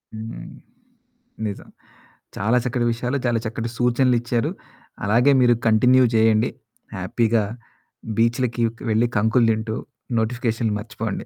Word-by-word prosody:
హ్మ్. 110 +9 -7 1.0
నిజం. 100 - -7 0.7
చాలా 115 +5 +2
చక్కటి 125 -1 -1
విషయాలు, 125 +4 -2
చాలా 120 -2 +1
చక్కటి 115 +1 -3
సూచనలిచ్చారు. 120 -1 +1 0.5
అలాగే 120 +7 +4
మీరు 120 -1 +5
కంటిన్యూ 125 +4 +5
చేయండి. 110 0 +3 0.5
హ్యాపీగా 115 -2 +1 0.7
బీచులకి 120 +1 +1 0.3
వెళ్లి 110 +2 +2
కంకులు 115 +3 +3
తింటూ, 110 0 -2 0.4
నోటిఫికేషన్లు 115 -1 -1
మర్చిపోండి. 110 -1 -5
115 Hz, 100 wpm, -22 LUFS, 110-125 Hz, 1.0 s, మీరు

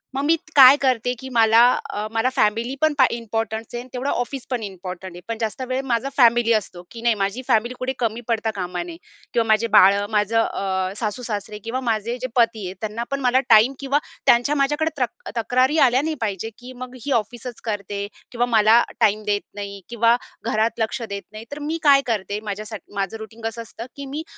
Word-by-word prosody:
मग 275 - -1
मी 325 +2 +4 0.2
काय 270 0 +10
करते? 250 -2 +1
की 265 - -8
मला, 225 0 +5 0.3
अ, 210 +1 -3
मला 225 +3 +1
फॅमिलीपण 255 +7 +1 0.2
इम्पोर्टंट 225 -1 -3
आहे. 240 - -3
आणि 255 - -14
तेवढं 260 +3 -2
ऑफिसपण 245 -1 -3
इम्पॉर्टंट 185 -1 -7
आहे, 175 - -10
पण 230 -1 -3
जास्त 220 +3 -3
वेळ 260 +1 -1
माझा 235 +4 0
फॅमिली 235 -2 +5
असतो, 185 -4 -2
की 230 - -9
नाही 235 -2 +2
माझी 200 +6 -1
फॅमिली 235 0 +2
कुठे 260 +1 -2
कमी 230 -1 -1
पडता 225 -1 0
कामा 180 -2 -3
नये 170 -1 -9 0.4
किंवा 235 -2 +3
माझे 220 +1 +3
बाळं 200 +2 +6
माझं 210 +1 +2
अ, 190 -3 -2
सासू-सासरे 210 -2 -4
किंवा 250 +3 -2
माझे 225 +2 -1
जे 255 - -2
पती 230 -4 +2
आहेत 185 - -7
त्यांनापण 235 +6 -3
मला 255 +1 +3
टाईम 225 +4 +6
किंवा 275 +1 +1 0.3
त्यांच्या 245 +5 +4
माझ्याकडे 295 +3 +1
तक 240 - -3
तक्रारी 255 +6 +2
आल्या 250 +3 +2
नाही 315 +1 -2
पाहिजे, 210 0 -2
की 250 +1 -10
मग 255 0 -10
ही 285 - -2
ऑफिसच 240 +1 -10
करते 200 -1 -3 0.2
किंवा 245 0 +1
मला 225 0 +5 0.2
टाईम 215 +1 +3
देत 205 -1 +1
नाही 200 -1 -6
किंवा 235 0 +3 0.4
घरात 220 +2 0
लक्ष 225 +2 -1
देत 200 0 -5
नाही. 215 +1 -9
तर 290 - -6
मी 330 - -1
काय 280 -2 +6
करते? 205 -1 -2
माझ्यासाठी 215 +1 -7
माझं 195 +2 -2
रुटीन 220 +1 -11
कसं 225 +1 -3
असतं, 230 +1 -9
की 280 - -7
मी 290 +4 -5
230 Hz, 195 wpm, -22 LUFS, 210-250 Hz, 0.4 s, काय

